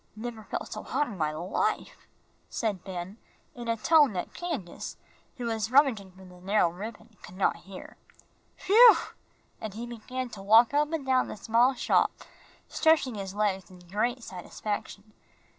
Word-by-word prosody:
Never 220 -1 -7
felt - - -5
so - - -6
hot 295 - -1
in 240 - -8
my 155 -4 0
life," 185 - -2 0.4
said 205 -5 -2
Ben, 190 +2 -7 0.3
in 240 -1 -8
such 230 -1 0
a - - -21
tone 300 -7 +5
that 180 -2 -4
Candace, 310 - -5 0.4
who 245 - -4
was 225 -1 -1
rummaging 245 -8 +3
for 190 +1 -15
the 180 -1 -15
narrow 195 -2 +2
ribbon, 220 +3 -9
could 180 - -12
not 195 - +2
hear. 195 -1 -10 0.7
"Whew!" 455 +3 +8 0.6
and 215 -2 -6
he 230 +2 -5
began 245 +2 -5
to 210 -4 -9
walk 225 +6 +6
up 295 +1 +2
and 320 -4 -3
down 260 -1 +2
the - - -7
small 235 +5 +3
shop, - - +2 0.6
stretching 315 -6 +2
his 195 -2 -6
legs 200 -3 -1
in 185 - -14
great 215 +8 -2
satisfaction. 205 +2 -6
220 Hz, 165 wpm, -28 LUFS, 195-255 Hz, 0.7 s, Whew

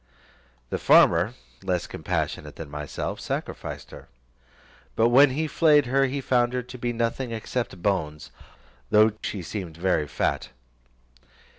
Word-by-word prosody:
The - - -1
farmer, - - +5 0.3
less 90 -2 -1
compassionate - - -3
than 80 -3 -8
myself; 75 -1 -4
sacrificed - - -5
her; - - -12 0.9
but 115 +1 +4
when 135 +4 +7
he 150 +5 -1
flayed 150 -2 +4
her, 135 +2 +2
found 120 -1 +2
her 125 -1 -1
to 125 +1 -10
be 120 0 -1
nothing 115 +2 -2
except 115 -4 -4
bones, 75 -7 -1 0.6
though 110 +1 +5
to 105 - -22
she 95 -4 -4
seemed 85 -3 -6
very 85 -4 +1
fat. - - -1
115 Hz, 135 wpm, -25 LUFS, 90-125 Hz, 0.9 s, when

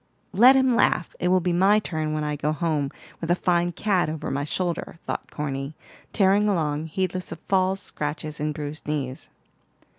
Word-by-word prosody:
"Let 245 +7 +7
him 260 -2 +4
laugh; 180 -6 +2
it 175 - 0
will 185 0 +4
be 180 0 0
my 195 +4 +5
turn 155 -7 -2
when 155 0 -1
I 150 0 -1
go 150 +1 -1
home, 155 -2 0 0.3
with 165 - -5
a 175 - +4
fine 175 -1 +1
cat 185 -3 +1
over 155 -2 -4
my 140 +1 -1
shoulder," 170 +2 -3
thought - - -4
Corny, 140 0 -4 0.4
tearing 200 +1 +3
along, 155 -4 0
heedless 185 +2 -3
of 165 - -5
falls, 190 0 +2
scratches, 150 +1 -4
and 150 +1 -1
bruised 150 0 -6
knees. 140 -4 -3
165 Hz, 180 wpm, -25 LUFS, 150-185 Hz, 0.4 s, Let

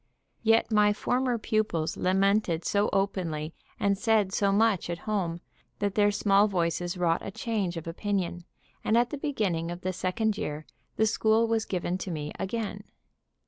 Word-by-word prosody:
Yet 225 0 +3
my 210 -1 +4
former 250 +3 0
pupils 215 -8 -1
lamented 195 -2 +1
so 205 +1 +2
openly 175 -6 -1 0.3
and 200 0 +2
said 215 -4 +2
so 200 -2 +2
much 205 -3 +2
at 170 - -2
home, 180 -6 -1 0.4
that 205 -1 -1
their 205 0 +4
small 205 0 +3
voices 175 -1 -1
wrought 170 -2 +1
a - - -4
change 195 -4 -2
of 165 - -6
opinion, 175 0 -2 0.4
and 220 - +2
at 240 0 +2
the 295 - -3
beginning 200 - -1
of 175 +1 -6
the 185 0 -2
second 205 +4 -1
year 150 +1 -4 0.3
the 220 - +3
school 220 +1 +3
was 225 -1 0
given 180 0 -2
to 190 - -5
me 150 -3 -4
again. 205 0 -3
200 Hz, 165 wpm, -28 LUFS, 175-220 Hz, 0.4 s, my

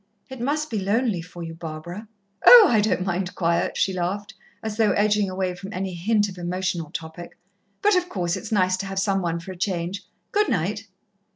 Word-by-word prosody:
"It 260 -2 -8
must 300 +3 -1
be 220 - -1
lonely 205 -1 0
for 175 0 -9
you, 165 0 -6
Barbara." 165 +5 -7 0.4
"Oh, 475 -3 +11
I 220 -3 +3
don't 205 -3 0
mind 180 0 -2
quiet," 170 -1 0
she 190 - +1
laughed, 195 +4 -3 0.3
as 220 -1 -3
though 215 -3 +3
edging 210 -1 +2
away 185 -1 -2
from 190 +3 -9
any 190 -1 -3
hint 205 +4 +1
of 185 -2 -9
emotional 175 -2 -2
topic. 165 +2 -8 0.5
"But, 415 -1 +5
of 360 -1 +1
course, 175 - -1
it's 220 - -7
nice 185 -3 +2
to 195 - -4
have 195 0 -6
some 195 0 +1
one 170 -1 -1
for 185 +3 -8
a - - -8
change. 180 +1 -2 0.3
Good 420 +1 +2
night." 200 +5 -1
190 Hz, 200 wpm, -24 LUFS, 175-210 Hz, 0.5 s, Oh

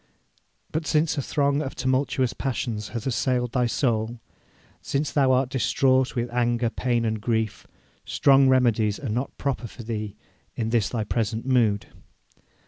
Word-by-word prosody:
But 155 0 -2
since 155 0 +2
a 140 - -1
throng 140 +1 +1
of 135 -3 -5
tumultuous 130 -1 0
passions 115 -6 -3
hath 115 -3 -6
assailed 125 -2 0
thy 125 -1 +1
soul, 115 -2 -1 0.6
since 140 0 -1
thou 135 -3 +3
art 130 0 +2
distraught 130 0 +2
with 120 0 -2
anger, 120 -1 +1
pain, 120 -2 0
and 110 -1 -1
grief, 110 -1 -1 0.4
strong 135 -1 +4
remedies 115 -5 +2
are 135 - -5
not 125 +5 -3
proper 135 -4 -2
for 120 - -11
thee 110 -2 -4 0.4
in 115 -1 -2
this 115 -4 +2
thy 115 -3 -2
present 110 +1 -2
mood. 115 -8 +2
125 Hz, 150 wpm, -25 LUFS, 115-135 Hz, 0.6 s, strong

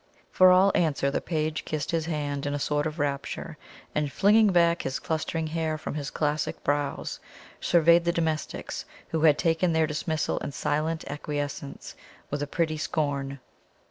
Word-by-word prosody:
For 185 0 +7
all 185 +2 +6
answer 140 -4 +1
the - - -1
page 155 -2 -2
kissed 150 -2 -3
his 165 -1 -1
hand 145 -3 -2
in 145 - -1
a - - 0
sort 145 +1 0
of 155 +1 -6
rapture, 140 -2 -3 0.3
and 150 -2 0
flinging 210 +5 +5
back 170 -1 +3
his 135 0 -2
clustering 160 0 -2
hair 160 0 -1
from - - -5
his 145 -1 -3
classic 150 0 -2
brows, 145 0 -1 0.4
surveyed 170 0 +4
the 170 - +3
domestics, 160 -2 -2 0.2
who 160 - -1
had 155 -2 +6
taken 165 +1 +2
their 160 0 +3
dismissal 155 +1 -1
in 145 - -5
silent 155 +3 -1
acquiescence, 145 -1 -5 0.4
with 145 0 -2
a 145 - -2
pretty 160 0 -1
scorn. 140 -3 -2
155 Hz, 165 wpm, -27 LUFS, 145-165 Hz, 0.4 s, For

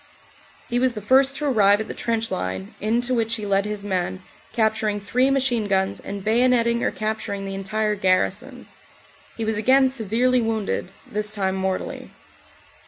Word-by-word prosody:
He 240 - 0
was 255 -1 +2
the 215 - -5
first 265 +6 +3
to 300 - -3
arrive 205 -7 +4
at 220 - -4
the - - -5
trench 225 -1 -1
line, 95 +1 -4
into 240 +4 0
which 230 -1 +1
he 215 -2 -5
led 200 0 +1
his 210 -1 -4
men, 185 -1 -2 0.3
capturing 220 -2 0
three 250 +6 +1
machine 255 -5 +1
guns 190 -1 0
and 200 -1 -7
bayonetting 235 +1 +3
or - - +1
capturing 215 -2 -3
the 195 - -5
entire 210 +2 -1
garrison. 185 -2 0 0.7
He 225 - -2
was 220 -1 0
again 260 +4 +4
severely 250 +1 +1
wounded, 220 -4 -2
this 210 0 -3
time 190 -3 -1
mortally. 190 0 -3
215 Hz, 165 wpm, -23 LUFS, 200-240 Hz, 0.7 s, arrive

